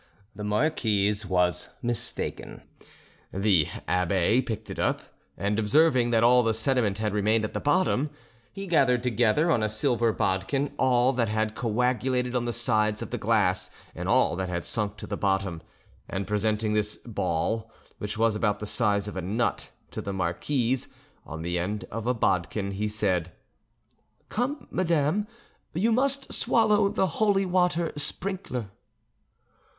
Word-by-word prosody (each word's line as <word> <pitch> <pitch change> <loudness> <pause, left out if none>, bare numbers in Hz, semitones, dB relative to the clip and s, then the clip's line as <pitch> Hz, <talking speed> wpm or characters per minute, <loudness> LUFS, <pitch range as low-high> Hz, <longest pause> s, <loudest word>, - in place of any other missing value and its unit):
The 105 - -6
marquise 105 -4 +1
was 90 -1 +1
mistaken: 120 -2 -4 0.7
the 95 -5 +3 0.2
abbe 90 +6 +2
picked 110 -3 -5
it - - -6
up, - - +1 0.4
and 100 +2 0
observing 130 +2 +4
that 115 -1 +3
all 125 +1 +6
the 115 -2 +1
sediment 110 -4 +1
had 105 -2 -1
remained 110 +2 +2
at - - -6
the - - -2
bottom, 145 -1 +2 0.4
he 195 - -7
gathered 135 -9 +3
together 125 +6 +2
on 120 - +2
a 110 - +1
silver 115 +1 +1
bodkin 100 +9 -1
all 125 0 +3
that 120 -4 0
had 110 0 0
coagulated 125 +2 0
on 120 -1 0
the 120 - -1
sides 110 -2 +1
of - - -9
the - - -3
glass - - +1 0.2
and - - -4
all - - +3
that 95 -1 -2
had 90 -1 -3
sunk 105 -2 -2
to - - -7
the - - -4
bottom, 95 -4 0 0.5
and 95 +1 -3
presenting 105 +1 0
this 105 0 0
ball, 110 +1 -2 0.3
which 105 +1 -4
was 115 -1 +2
about 105 -1 +1
the 105 - -6
size 105 -2 +1
of 105 - -6
a 95 - -2
nut, 105 +5 -1 0.2
to - - -5
the 100 - -4
marquise, 115 +8 -1 0.4
on 80 +1 -6
the 90 +1 -1
end 100 +4 -3
of 115 +1 -4
the 125 +1 +1
bodkin, 100 -1 0
he 105 +2 -2
said, 95 -5 0 1.0
"Come, 250 +3 -2
madame, 170 +3 +1 0.5
you 215 +7 +2
must 275 +3 0
swallow 215 -3 +3
the 190 - +1
holy 195 +2 +1
water 180 -2 +1
sprinkler." 145 - -4
110 Hz, 155 wpm, -27 LUFS, 100-130 Hz, 1.0 s, all